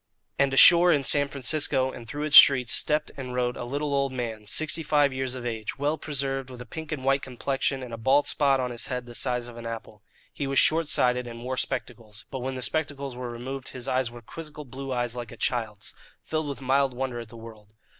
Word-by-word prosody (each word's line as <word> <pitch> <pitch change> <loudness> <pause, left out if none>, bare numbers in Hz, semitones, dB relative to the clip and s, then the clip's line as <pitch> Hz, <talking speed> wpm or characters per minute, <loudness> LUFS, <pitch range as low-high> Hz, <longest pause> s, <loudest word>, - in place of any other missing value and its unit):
And 140 -1 +3
ashore 175 +6 +8
in 145 -4 +2
San 145 +1 +5
Francisco 135 -1 0
and 115 -2 -10
through 145 +5 -5
its 155 -1 +1
streets 125 -4 +8
stepped 150 0 +2
and 125 -2 -6
rode 125 -1 0
a - - -6
little 140 +4 -3
old 140 -1 +1
man, 115 -4 -5
sixty 155 +9 0
five 145 -2 +2
years 130 -1 -3
of 125 -1 -7
age, 110 -1 -4
well 145 +2 0
preserved, 135 -4 -3
with 125 -1 -10
a 125 - -8
pink 160 +3 -8
and 135 -4 -4
white 135 +1 +3
complexion 135 +1 -2
and 120 -2 -8
a - - -4
bald 135 +5 +3
spot 140 -2 +2
on 125 -1 -2
his 120 - -3
head 125 -1 -4
the 120 - -11
size 125 0 -2
of 120 -1 -11
an 115 0 -7
apple. 110 -2 -8 0.3
He 140 - -3
was 135 0 -2
short 160 0 +4
sighted 125 -3 +1
and 115 0 -9
wore 130 +1 -3
spectacles. 115 -3 -4
But 130 - -4
when 130 +1 -4
the 130 - -3
spectacles 140 -3 -2
were 125 -1 -5
removed, 130 +3 -6
his 125 - -7 0.2
were 120 0 -12
quizzical 150 +3 -9
blue 135 +1 -7
eyes 120 -1 -2
like 120 -3 -6
a - - -11
child's, 110 -4 -3 0.3
filled 155 -1 -2
with 140 -1 -6
mild 135 0 +1
wonder 130 -1 -3
at 115 -2 -9
the 115 - -12
world. 110 -2 -13
130 Hz, 230 wpm, -26 LUFS, 120-140 Hz, 0.3 s, ashore